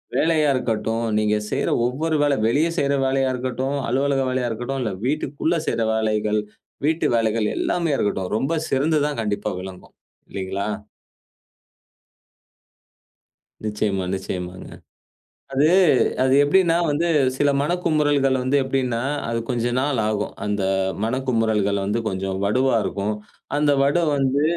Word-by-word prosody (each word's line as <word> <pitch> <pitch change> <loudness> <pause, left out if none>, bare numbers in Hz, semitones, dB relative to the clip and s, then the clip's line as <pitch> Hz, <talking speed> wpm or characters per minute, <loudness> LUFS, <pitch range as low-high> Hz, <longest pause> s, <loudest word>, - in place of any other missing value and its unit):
வேலையா 155 -2 +3
இருக்கட்டும், 115 -1 -1
நீங்க 105 0 +2
செய்ற - - 0 0.2
ஒவ்வொரு 155 +6 -1
வேலை, 145 -1 +3
வெளிய 150 +8 +2
செய்ற 140 0 +1
வேலையா 135 0 +1
இருக்கட்டும், 130 +2 -2
அலுவலக 135 +2 +1
வேலையா 125 -1 -1
இருக்கட்டும், 120 +4 -3
இல்ல 110 - -2
வீட்டுக்குள்ள 150 +3 -1
செய்ற 115 - 0
வேலைகள், 110 -1 0 0.4
வீட்டு 160 +2 +1
வேலைகள் 110 -1 +1
எல்லாமே 170 -4 0
இருக்கட்டும். 95 -2 -1
ரொம்ப 135 +7 -1 0.2
சிறந்துதான் 145 -1 +1
கண்டிப்பா 105 0 -2
விளங்கும். 95 -1 -11 0.3
இல்லீங்களா? 95 +1 -3 3.0
நிச்சயமா, 105 -3 -1
நிச்சயமாங்க. 90 -1 -5 0.8
அது 140 +3 +3 0.6
அது 130 0 +3
எப்படின்னா 165 +3 +3
வந்து 155 +4 0 0.3
சில 145 0 +3
மனக்குமுறல்கள் 145 -5 +1
வந்து 135 +2 +2
எப்படின்னா 130 -3 -1 0.3
அது 115 0 -1
கொஞ்ச 120 -2 -1
நாள் 135 -3 0
ஆகும். 105 -1 -2
அந்த 105 -1 -1 0.4
மனக்குமுறல்கள் 110 -5 0
வந்து 105 +4 0
கொஞ்சம் 95 0 -2
வடுவா 130 +5 +2
இருக்கும். 105 +2 -2 0.4
அந்த 150 -1 +3
வடு 145 +5 +2
வந்து 140 +1 +1
130 Hz, 120 wpm, -22 LUFS, 105-145 Hz, 3.0 s, வேலையா